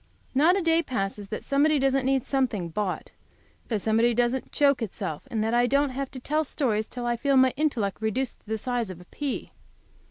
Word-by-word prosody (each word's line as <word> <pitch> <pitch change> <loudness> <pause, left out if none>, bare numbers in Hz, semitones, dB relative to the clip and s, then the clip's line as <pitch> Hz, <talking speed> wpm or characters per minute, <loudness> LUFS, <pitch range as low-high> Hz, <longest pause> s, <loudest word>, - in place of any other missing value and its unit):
Not 320 +8 +4
a 390 - -1
day 330 0 +4
passes 205 -7 -3
that 215 - -5
somebody 290 +2 +3
doesn't 270 -1 +2
need 265 -2 +1
something 245 -10 0
bought; 195 +2 -3 0.6
that 225 - 0
somebody 225 +3 +3
else - - -6
doesn't 245 +2 0
choke 280 -3 +3
itself, 195 - -4
and 225 -4 -1
that 225 +1 0
I 240 0 +4
don't 280 +1 +2
have 270 +1 -3
to 260 - -8
tell 305 +5 0
stories 230 -7 -1
till 245 -1 -6
I 240 0 +1
feel 275 +2 +2
my 260 -1 +5
intellect 245 -10 0
reduced 240 +4 -1
to - - -35
the 220 +1 -1
size 240 -1 -2
of 180 -2 -8
a 180 - -14
pea. 280 +6 -4
250 Hz, 215 wpm, -26 LUFS, 220-275 Hz, 0.6 s, my